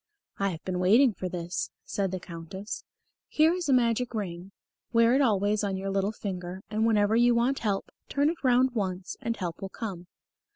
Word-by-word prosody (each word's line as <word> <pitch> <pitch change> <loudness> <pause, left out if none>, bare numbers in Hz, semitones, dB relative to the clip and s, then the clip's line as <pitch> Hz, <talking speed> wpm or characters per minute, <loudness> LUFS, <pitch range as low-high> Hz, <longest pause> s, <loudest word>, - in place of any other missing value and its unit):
"I 200 0 +2
have 165 -3 -6
been 185 -1 -2
waiting 225 +7 +5
for 185 -1 -4
this," 175 0 -3 0.2
said 195 -1 -1
the 185 0 -3
Countess. 180 +5 -7 0.4
"Here 315 +2 +4
is 355 -4 -3
a - - +5
magic 240 -1 +2
ring. 185 -2 -4 0.4
Wear 230 0 +5
it 270 - +4
always 210 -3 +2
on 195 -2 -1
your 195 +1 -3
little 195 +1 +1
finger, 185 -3 -6
and 220 +1 +2
whenever 210 -1 +3
you 240 +1 +5
want 245 +4 +2
help, 200 -3 -2 0.2
turn 285 +2 +2
it 335 - -10
round 255 0 +4
once 190 -5 -3
and 230 0 -2
help 175 -3 -4
will 195 - -4
come." 190 -5 -6
205 Hz, 195 wpm, -28 LUFS, 185-235 Hz, 0.4 s, waiting